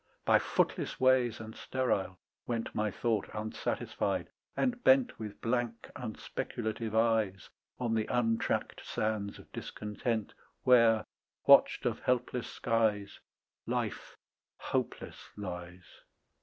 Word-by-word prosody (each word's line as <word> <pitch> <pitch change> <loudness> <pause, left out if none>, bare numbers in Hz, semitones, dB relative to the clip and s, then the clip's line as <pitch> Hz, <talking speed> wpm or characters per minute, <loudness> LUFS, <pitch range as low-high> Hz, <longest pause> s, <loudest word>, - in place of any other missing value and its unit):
By - - +6
footless - - 0
ways 130 -3 +4
and 110 0 -8
sterile 100 -8 -1 0.3
went 115 -2 -2
My 105 0 0
thought 110 +1 -1
unsatisfied, 110 +1 -2 0.3
and 245 -1 0
bent 265 -1 +4
With 105 -2 -6
blank 115 -1 -1
unspeculative 110 -1 -4
eyes 110 -5 +2 0.3
On 120 -2 -1
the 110 -1 +1
untracked 115 -2 0
sands 105 -2 -2
of - - -15
discontent 105 +1 -3 0.3
Where, 115 -3 +5 0.4
watched - - +6
of - - 0
helpless 125 -1 0
skies, 110 -4 0 0.5
Life - - -3 0.4
hopeless - - -3 0.2
lies. 90 -3 -6
115 Hz, 105 wpm, -32 LUFS, 105-120 Hz, 0.5 s, By